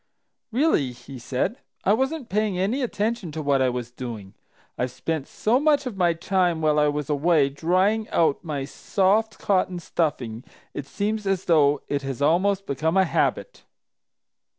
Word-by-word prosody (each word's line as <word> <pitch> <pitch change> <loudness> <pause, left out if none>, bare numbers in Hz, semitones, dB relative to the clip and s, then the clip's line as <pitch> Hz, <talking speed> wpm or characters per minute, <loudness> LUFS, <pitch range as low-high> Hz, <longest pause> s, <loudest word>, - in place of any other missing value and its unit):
"Really," 230 - +2
he 125 +2 -11
said, 135 - -2 0.2
"I 200 - +4
wasn't 265 +3 -1
paying 210 -3 0
any 205 +9 0
attention 220 -6 -2
to 160 - -4
what 140 -2 +2
I 130 - +3
was 120 -1 -4
doing! 115 -6 -7 0.4
I've 125 - -1
spent 140 +4 -3
so 235 +4 +1
much 295 -1 +2
of 250 -5 -4
my 175 -3 +2
time 175 0 0
while 155 -1 +2
I 150 - +4
was 145 -1 -2
away 150 0 +3
drying 185 +9 +1
out 160 -2 +1
my 145 -5 -3
soft 210 +8 +1
cotton 185 -2 0
stuffing 130 -9 -2 0.3
it 145 - -6
seems 210 +4 -2
as 190 -1 0
though 145 -4 +3
it 140 -1 -1
has 135 -2 -5
almost 185 +7 +2
become 160 +6 0
a 190 - +5
habit." - - -1
170 Hz, 165 wpm, -24 LUFS, 140-205 Hz, 0.4 s, a